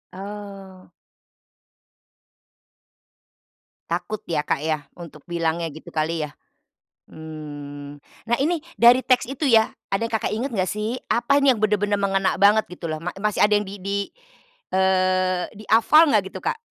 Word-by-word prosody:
Oh. 195 -2 -9 3.0
Takut 175 +5 -3
ya 160 -3 0
Kak - - 0
ya 155 -2 -1
untuk 165 -4 -11
bilangnya 170 -1 -1
gitu 155 - -12
kali 160 +1 -1
ya? - - -15 0.8
Mmm, 145 -2 -9 0.3
nah 235 - +3
ini 315 +3 0 0.2
dari 245 +2 +7
teks 255 -2 +2
itu 275 +3 -2
ya, 225 -3 +4 0.2
ada 195 +3 0
yang 230 - -10
Kakak 220 - -1
inget 235 +6 -2
gak 185 -3 0
sih? 215 +4 -3
Apa 280 +4 +3
ini 280 -1 +5
yang 245 - +1
bener-bener 205 -1 +1
mengena 195 -1 +1
banget 205 +2 +4
gitu 180 -1 -7
loh, 155 -1 -4
ma 180 - -3
masih 210 +1 0
ada 210 - +5
yang 205 0 -1
di 195 +1 -9
di 200 +1 -1 0.7
eee, 185 -1 +2
dihafal 230 +9 +5
gak - - +4
gitu, - - -7
Kak? - - -1
195 Hz, 150 wpm, -23 LUFS, 170-220 Hz, 3.0 s, dari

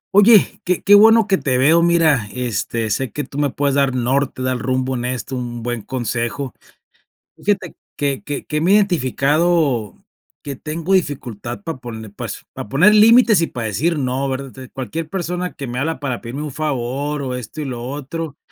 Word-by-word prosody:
Oye, 205 0 +6
que 180 0 -1
que 205 - +5
bueno 220 +2 +7
que 195 -2 +1
te 130 -4 0
veo. 155 +6 +5
Mira, 165 -9 +3
este, 115 -2 -2
sé 130 +3 -1
que 150 - -3
tú 140 - -7
me 145 -1 +2
puedes 140 +1 0
dar 140 -2 +2
norte, 130 +1 0
dar 130 -1 -1
rumbo 130 +1 -1
en 120 0 -3
esto, 125 +1 -3
un 120 -2 -5
buen 120 -1 -3
consejo. 120 +2 -3 0.8
Fíjate 195 -4 -2 0.2
que 140 -2 -1
que 145 -1 -5
que 150 0 -2
me 175 +4 +2
he - - +7
identificado 155 - +1 0.4
que 140 -1 -4
tengo 160 +7 -3
dificultad 125 - -2
para 165 -7 -5
pone 110 -3 -8
pues, 100 - -7
para - - -7
poner 180 - +5
límites 225 -2 +6
y 165 - +1
para 115 -2 -4
decir 150 - 0
no, 135 +1 -1
¿verdad? 135 0 -4
De 130 -2 -11
cualquier 155 +5 -5
persona 180 -1 -3
que 140 - -7
me 120 +1 -5
habla 160 +5 -1
para 130 -4 -3
pedirme 125 +5 -5
un 150 - -5
favor, 145 0 -2
o 130 -2 -3
esto 125 +4 -7
y 150 - -3
lo 125 -3 -5
otro, 145 +2 -5
140 Hz, 190 wpm, -19 LUFS, 125-165 Hz, 0.8 s, bueno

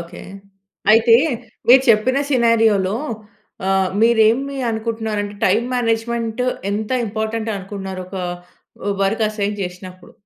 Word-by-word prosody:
Okay. 170 +1 -10 0.7
అయితే 230 +1 +6 0.5
మీరు 260 +1 +8
చెప్పిన 250 +5 +3
సినారియో‌లో 225 -5 +3 0.7
ఆహ్, 190 -1 +2
మీరు 230 0 +4
ఏమి 275 +4 -1
అనుకుంటున్నారంటే? 220 -2 -3
టైమ్ 215 +5 +2
మేనేజ్మెంట్ 230 0 -1 0.3
ఎంత 215 +2 -3 0.2
ఇంపార్టెంట్ 220 +1 -3
అనుకున్నారు? 190 -1 -6
ఒక 190 - -8 0.9
వర్క్ 215 +3 0
అసైన్ 210 -1 -3
చేసినప్పుడు? 180 0 -9
220 Hz, 105 wpm, -19 LUFS, 195-230 Hz, 0.9 s, మీరు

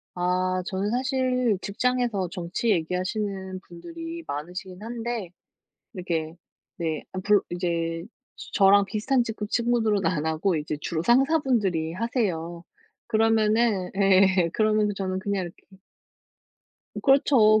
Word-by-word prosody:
아 185 +1 0
저는 195 +2 -2
사실 255 -3 +1
직장에서 230 -3 0
정치 180 +5 -2
얘기하시는 190 +2 -2
분들이 330 - -8
많으시긴 180 +6 -6
한데 230 -4 -4 0.6
이렇게 165 -4 -3 0.4
네. 160 -2 -3
엄풀 200 +2 +2
이제 170 -2 -2 0.5
저랑 200 -1 +6
비슷한 230 +6 +1
직급 220 -2 -5
친구들은 225 -6 +1
안 160 -3 0
하고 160 +3 +1
이제 150 0 -3
주로 160 +1 -2
상사분들이 240 - +2
하세요. 180 -6 -2 0.4
그러면은 220 -3 +2
예. 190 -2 +4
그러면서 215 -1 +2
저는 190 -1 -2
그냥 200 -1 -2
이렇게 190 +2 -13 1.2
그렇죠. 255 -6 +5
195 Hz, 265 characters per minute, -25 LUFS, 180-230 Hz, 1.2 s, 저랑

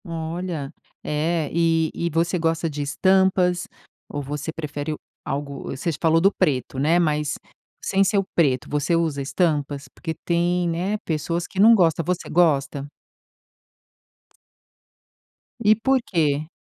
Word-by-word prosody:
Olha, 165 -2 -4 0.3
é 155 0 -1
e 165 -1 +2
e 170 - -2
você 170 +3 0
gosta 165 0 0
de 150 -1 -5
estampas 180 +3 +2 0.4
ou 145 - -4
você 145 +3 -4
prefere 150 -1 -4 0.3
algo 140 0 -4
você 165 +6 -2
falou 165 0 +4
do 195 +4 +4
preto 130 -2 0
né, 155 +5 +3
mas 150 -3 +1 0.5
sem 195 0 +2
ser 200 +1 +1
o 195 - +3
preto 130 -7 +2
você 150 +3 +1
usa 160 -4 0
estampas? 145 -1 -1
Porque 165 -2 -5
tem, 175 0 +1
né, 180 +5 -1
pessoas 165 +2 -2
que 190 - -7
não 220 +3 +8
gosta, 165 -4 +3
você 180 +2 -2
gosta? 145 -4 +1 2.7
E 215 -1 +5
por 265 +4 +2
quê? 155 -6 0
165 Hz, 135 wpm, -23 LUFS, 145-175 Hz, 2.7 s, não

